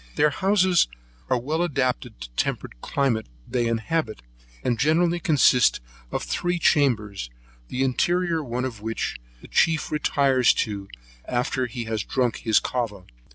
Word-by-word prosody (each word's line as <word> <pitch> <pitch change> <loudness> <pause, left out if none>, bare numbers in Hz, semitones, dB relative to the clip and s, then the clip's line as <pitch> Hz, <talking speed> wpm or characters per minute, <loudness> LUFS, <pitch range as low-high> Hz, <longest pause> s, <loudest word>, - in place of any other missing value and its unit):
Their 150 0 +3
houses 185 0 +3 0.4
are - - +3
well 155 +7 -1
adapted 130 - -1
to 60 - -7
the - - -31
temperate - - -2
climate 130 -6 0 0.2
they 120 -1 0
inhabit, 115 - -2 0.4
and 120 -2 0
generally 170 +3 +2
consist 145 -6 +4 0.3
of - - -2
three 175 - -1
chambers, 110 - +1 0.4
the 130 +1 -1
interior 170 +5 +1
one 125 0 -2
of 115 -5 -6
which 110 - -3 0.2
the - - -12
chief 160 -1 +2
retires 140 -4 +3
to, 100 -2 -6 0.4
after 125 +1 -1
he 120 0 -5
has 110 -1 -2
drank 125 -3 0
his 110 -1 +3
cava. 110 -7 -3
130 Hz, 145 wpm, -24 LUFS, 115-155 Hz, 0.4 s, consist